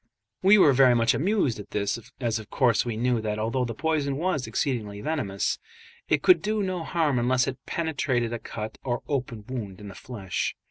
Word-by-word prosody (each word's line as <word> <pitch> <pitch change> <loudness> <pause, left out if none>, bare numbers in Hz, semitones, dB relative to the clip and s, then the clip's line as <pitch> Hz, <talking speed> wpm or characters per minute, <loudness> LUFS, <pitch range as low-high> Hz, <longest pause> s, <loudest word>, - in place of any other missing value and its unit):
We 195 +3 +7
were 150 -8 +6
very 130 -1 +6
much 115 0 +3
amused 170 - +1
at 105 - -9
this, 100 +2 -1 0.2
as 115 -3 0
of 110 - -11
course 120 -5 +3
we 115 -3 -3
knew 120 0 +1
that 105 -1 -2
although 115 +4 0
the 115 -2 -5
poison 150 -2 0
was 155 -5 -1
exceedingly 110 -7 -2
venomous, 105 -8 -1 0.5
it - - +2
could 365 - +6
do 215 0 0
no 185 -3 -2
harm 155 -7 +1
unless 125 +1 +2
it 135 -1 -5
penetrated 130 -8 -1
a 120 - -3
cut 110 -1 -7
or 120 -2 -2
open 125 -7 -3
wound 105 -8 -5
in 105 -1 -9
the - - -9
flesh. 100 -7 -4
125 Hz, 195 wpm, -26 LUFS, 110-150 Hz, 0.5 s, We